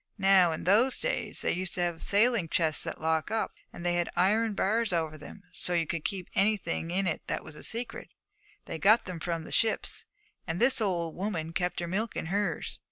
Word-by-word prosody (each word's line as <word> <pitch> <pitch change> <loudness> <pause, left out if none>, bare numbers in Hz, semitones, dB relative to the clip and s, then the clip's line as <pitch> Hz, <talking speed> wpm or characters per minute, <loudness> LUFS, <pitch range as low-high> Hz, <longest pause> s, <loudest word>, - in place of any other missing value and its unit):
Now, 190 -3 +5
in 160 - -4
those 225 +8 +4
days - - -2
they - - +2
used 185 0 -2
to 180 - -1
have 175 -2 -1
sailing 210 -4 +2
chests 160 -1 +1
that - - -5
lock 160 +1 0
up; 220 +1 -1 0.2
they 175 0 -2
had 175 0 0
iron 210 +4 +2
bars 220 +3 +1
over 160 -3 -1
them, 155 +6 -11
so 180 - -1
you 170 -1 +2
could 165 -1 -3
keep 190 -4 -3
anything 195 -5 +1
in 180 -2 0
that - - -2
was 155 - -11
a - - -11
secret. 235 +1 -2 0.6
They 160 - -5
got 215 +6 +5
them 180 -3 -6
from 165 0 -2
the - - -10
ships, 225 -1 0 0.4
and 170 0 -2
this 245 0 +4
old 170 -6 0
woman 175 -5 -3
kept 180 +1 -1
her 170 - -3
milk 210 +6 -2
in - - -3
hers. 200 -5 -1
180 Hz, 205 wpm, -29 LUFS, 165-210 Hz, 0.6 s, Now